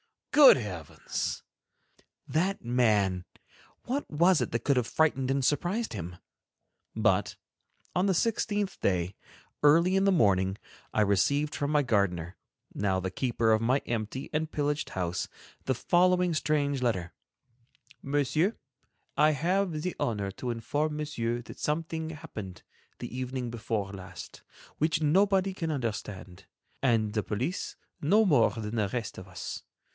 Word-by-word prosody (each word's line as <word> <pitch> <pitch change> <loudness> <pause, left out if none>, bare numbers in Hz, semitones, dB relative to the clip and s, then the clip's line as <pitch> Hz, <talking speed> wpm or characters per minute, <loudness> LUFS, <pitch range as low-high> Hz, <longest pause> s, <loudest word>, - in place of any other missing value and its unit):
good 290 -2 +9
heavens! 90 - -4 0.8
That 185 +5 0
man, 105 -7 +2 0.6
what 275 +4 -3
was 170 +3 +4
it - - -2
that - - -2
could 140 -2 +2
have 120 -2 +1
frightened 135 -5 +1
and 135 0 +1
surprised 175 - 0
him! 90 -4 -5 0.8
But, - - +2 0.6
on 180 +2 +2
the 190 - +2
sixteenth 205 -1 0
day, 90 -1 0 0.5
early 170 +5 +5
in 195 - +3
the 195 - +5
morning, 95 - +3 0.4
I 110 - +2
received 140 +9 +2
from 145 - -2
my 150 -1 +3
gardener, 95 -7 0 0.4
now 95 -2 0
the 95 0 -3
keeper 115 0 +1
of 110 0 +3
my 125 +4 +2
empty 120 +4 -3
and 155 +1 0
pillaged 145 0 -1
house, 90 -1 -2 0.4
the 130 - +1
following 180 +4 +3
strange 145 -3 0
letter: 95 -8 -1 0.9
"MONSIEUR: 145 - +1 0.6
"I 155 +1 +5
have 170 +2 0
the 180 - -2
honor 100 -4 -1
to 125 +5 -5
inform 145 +6 -1
Monsieur 120 -6 -2
that - - -11
something 160 +1 -2
happened, 105 - -8 0.4
the - - -6
evening 130 -1 -3
before 105 -3 -3
last, 95 -3 -9 0.4
which 160 +1 +1
nobody 190 +4 +3
can 165 -3 -3
understand, 105 - -4 0.4
and 115 -5 +2
the 110 - +1
police 120 - -3 0.3
no 210 +9 +4
more 140 - +5
than 115 0 -5
the 105 -2 +2
rest 115 -1 -4
of 95 - -11
us. 90 -1 -6
130 Hz, 140 wpm, -29 LUFS, 105-160 Hz, 0.9 s, good